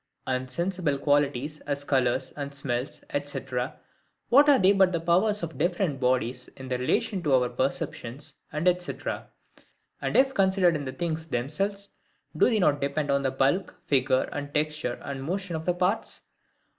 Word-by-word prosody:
And 130 0 -2
sensible 170 -1 -1
qualities, 145 0 +1
as 140 -1 -2
colours 130 -4 +1
and 140 -1 -5
smells, 130 -1 -3 0.2
&c. - - -4 0.9
what 285 +4 +7
are 280 - +7
they 190 -2 +5
but 190 -2 +4
the 170 - +1
powers 185 +5 +2
of 160 -2 -5
different 175 -3 0
bodies, 125 -1 0
in 130 -1 -8
relation 130 - 0
to 145 -5 +3
our 125 -1 +3
perception, 125 0 -3
&c.? - - -10 0.2
And, 155 +4 -1 1.5
if 270 0 +4
considered 190 -4 +3
in 145 -2 -3
the 130 - -3
things 160 +3 -3
themselves, 195 +10 -2 0.5
do - - +4
they 225 - +2
not 150 -7 +2
depend 140 +1 0
on 140 0 +2
the 135 - +1
bulk, 135 +8 +1
figure, 130 -1 +2 0.3
texture, 150 -4 -1
and 140 -1 -5
motion 180 +3 -3
of 160 0 -4
the 180 - +2
parts? 185 +5 -1
150 Hz, 155 wpm, -27 LUFS, 135-180 Hz, 1.5 s, what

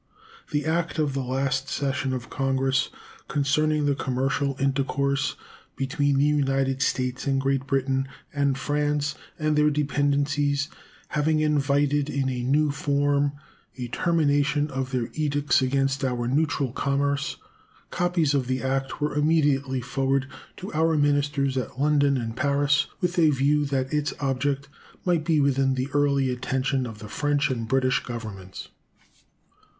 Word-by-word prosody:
The 145 0 -1
act 165 +1 0
of 150 -3 +1
the 135 - -1
last 135 +1 -1
session 135 -1 -1
of 125 -2 -5
Congress 135 -1 +1 0.4
concerning 150 +1 +1
the 145 - +3
commercial 135 +1 -1
intercourse 140 0 0 0.4
between 140 +1 0
the 140 - +4
United 135 -2 +1
States 125 +1 -1
and 135 -1 +2
Great 135 0 0
Britain 135 -1 0 0.3
and 140 -2 +1
France 145 +1 0 0.2
and 155 -1 +1
their 150 0 +4
dependencies 145 0 +1 0.4
having 155 +1 +1
invited 145 -1 +2
in 135 -1 0
a 125 -1 -2
new 145 +4 +2
form 145 0 +1 0.4
a 125 -1 -5
termination 145 -1 +1
of 130 0 -3
their 125 -3 -2
edicts 145 -4 +1
against 135 +1 0
our 125 -2 -1
neutral 140 -1 0
commerce, 140 +2 -1 0.5
copies 175 -5 +1
of 135 -3 0
the 130 0 -1
act 135 +2 -2
were 150 - 0
immediately 145 -3 +2
forwarded 135 +1 0 0.3
to 190 0 -7
our 160 +1 +2
ministers 145 -1 +1
at 130 0 -4
London 145 -1 +3
and 115 -2 -4
Paris, 140 +1 +2
with 180 -1 0
a 160 -2 +6
view 145 +1 +2
that 135 0 -2
its 150 0 0
object 140 0 -1 0.4
might 175 -3 +2
be 160 -1 +2
within 135 -1 +2
the 130 +1 -2
early 140 -2 +2
attention 130 +1 -1
of 110 -2 -8
the 105 0 -9
French 145 +3 0
and 115 -3 -3
British 130 +1 +2
Governments. 105 -6 -7
140 Hz, 145 wpm, -25 LUFS, 135-145 Hz, 0.5 s, a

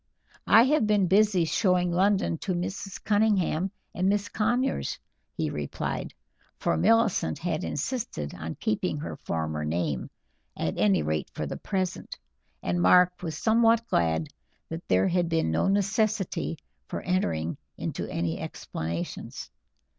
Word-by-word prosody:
"I 225 - +8
have 265 -4 +3
been 205 -2 +3
busy 190 -1 +4
showing 180 0 +2
London 190 -2 +2
to 185 -2 -2
Mrs. 185 +2 -4
Cunningham 200 -4 +2 0.2
and 185 +2 +1
Miss 205 0 0
Conyers," 245 +5 0 0.4
he - - -1
replied - - -3 0.5
for - - +1
Millicent 225 - +3
had 165 -2 -2
insisted 150 - -3
on 80 +1 -6
keeping 200 -7 -1
her 150 - -5
former 80 -2 -3
name, 75 -3 -1 0.5
at - - -1
any 100 -6 +3
rate 75 0 -1
for - - -2
the - - -4
present 190 -3 -3 0.5
and 85 0 0
Mark 180 - +5
was 160 -4 -4
somewhat 230 +3 +4
glad 80 -1 +1 0.4
that 165 +1 -6
there 95 +1 +3
had 175 -1 +1
been 165 - +1
no 80 - +1
necessity 200 -3 0 0.3
for - - -4
entering 85 - -1 0.2
into - - -4
any 85 -1 -2
explanations. 85 +2 -5
180 Hz, 135 wpm, -27 LUFS, -, 0.5 s, I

